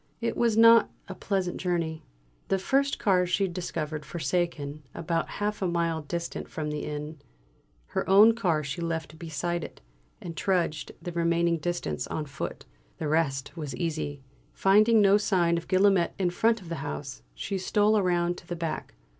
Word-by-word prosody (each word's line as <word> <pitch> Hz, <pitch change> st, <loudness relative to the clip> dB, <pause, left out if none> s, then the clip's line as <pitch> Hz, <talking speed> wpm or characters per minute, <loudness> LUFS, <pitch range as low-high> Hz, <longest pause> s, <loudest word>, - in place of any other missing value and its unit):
It 230 Hz, -, -1 dB
was 230 Hz, -2 st, +2 dB
not 230 Hz, 0 st, +7 dB, 0.2 s
a 190 Hz, -, -6 dB
pleasant 190 Hz, -2 st, -2 dB
journey. 170 Hz, -3 st, -1 dB, 0.5 s
The 195 Hz, -, +2 dB
first 275 Hz, +8 st, +1 dB
car 180 Hz, -3 st, +2 dB
she 195 Hz, +2 st, +1 dB
discovered 160 Hz, -4 st, -4 dB
forsaken, 155 Hz, -2 st, -2 dB
about 165 Hz, 0 st, -1 dB
half 210 Hz, 0 st, -2 dB
a 190 Hz, -, +1 dB
mile 170 Hz, -2 st, 0 dB
distant 170 Hz, +3 st, -5 dB
from 150 Hz, -1 st, -4 dB
the 150 Hz, 0 st, -4 dB
inn. 150 Hz, +1 st, -5 dB, 0.7 s
Her -, -, -3 dB
own 210 Hz, +4 st, +8 dB
car 170 Hz, -9 st, 0 dB
she 140 Hz, +4 st, -4 dB
left 160 Hz, -1 st, -4 dB
beside 170 Hz, +1 st, -3 dB
it, -, -, -9 dB, 0.4 s
and 170 Hz, -2 st, -7 dB
trudged 175 Hz, -6 st, 0 dB
the 175 Hz, -, -4 dB
remaining 170 Hz, 0 st, +1 dB
distance 155 Hz, -, -3 dB
on 155 Hz, -, -3 dB
foot. 140 Hz, -, -6 dB, 0.3 s
The 155 Hz, -, -3 dB
rest 140 Hz, -2 st, 0 dB
was 150 Hz, -6 st, -5 dB
easy. 145 Hz, -1 st, -3 dB, 0.3 s
Finding 215 Hz, +3 st, +5 dB
no 200 Hz, 0 st, +6 dB
sign 180 Hz, -5 st, +2 dB
of 170 Hz, -, -4 dB
Guillaumet 190 Hz, -2 st, +3 dB
in 185 Hz, -3 st, +1 dB
front 225 Hz, +4 st, +2 dB
of 175 Hz, -, -11 dB
the 170 Hz, -, -2 dB
house, 75 Hz, -, -6 dB
she 195 Hz, -, -3 dB
stole 210 Hz, +3 st, +3 dB
round 175 Hz, -1 st, +1 dB
to 170 Hz, -, -19 dB
the 175 Hz, -, -3 dB
back. 165 Hz, -2 st, -4 dB
170 Hz, 170 wpm, -27 LUFS, 155-195 Hz, 0.7 s, own